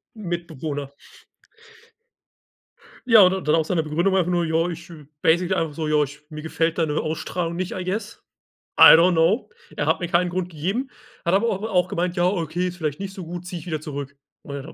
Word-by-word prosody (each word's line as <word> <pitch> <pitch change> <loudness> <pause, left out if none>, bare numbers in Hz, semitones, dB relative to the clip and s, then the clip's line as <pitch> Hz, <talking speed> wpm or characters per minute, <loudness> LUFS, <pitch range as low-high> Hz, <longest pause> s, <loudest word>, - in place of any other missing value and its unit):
Mitbewohner. 160 -7 -5 2.1
Ja, 225 -3 +8
und 185 -3 +3
dann 150 - +4
auch 160 -1 +1
seine 165 -3 0
Begründung 170 +6 0
einfach 180 -1 +1
nur, 175 -1 +1
ja, 165 +2 +1
ich 170 +1 -8 0.3
basically 175 +3 +2
einfach 160 -4 -1
so: 155 0 -3
„Ja, 150 -1 +3
ich 145 +2 -8
mir 155 -1 -7
gefällt 165 +1 -1
deine 155 -2 0
Ausstrahlung 165 +2 -3
nicht" 185 0 -3
I 185 - -4
guess 205 +4 -4 0.5
I - - +11
don't 175 +2 +5
know. 170 +8 +2 0.3
Er - - 0
hat - - +1
mir 175 - -3
keinen 175 0 +2
Grund 180 0 -3
gegeben, 195 - -3 0.3
hat 170 - 0
aber 205 +4 +3
au 200 +2 -2
auch 180 -4 +2
gemeint: 175 +2 -2
„Ja, 175 - +3
okay, 180 -1 -1
ist 180 - -5
vielleicht 155 -2 -3
nicht 195 -1 -5
so 185 - -7
gut, 175 +1 -7
zieh 175 -2 -5
ich 155 - -12
wieder 155 -2 -2
zurück.“ 140 -2 -7 0.2
Und 140 - -8
w 160 - -11
170 Hz, 205 wpm, -23 LUFS, 160-185 Hz, 2.1 s, I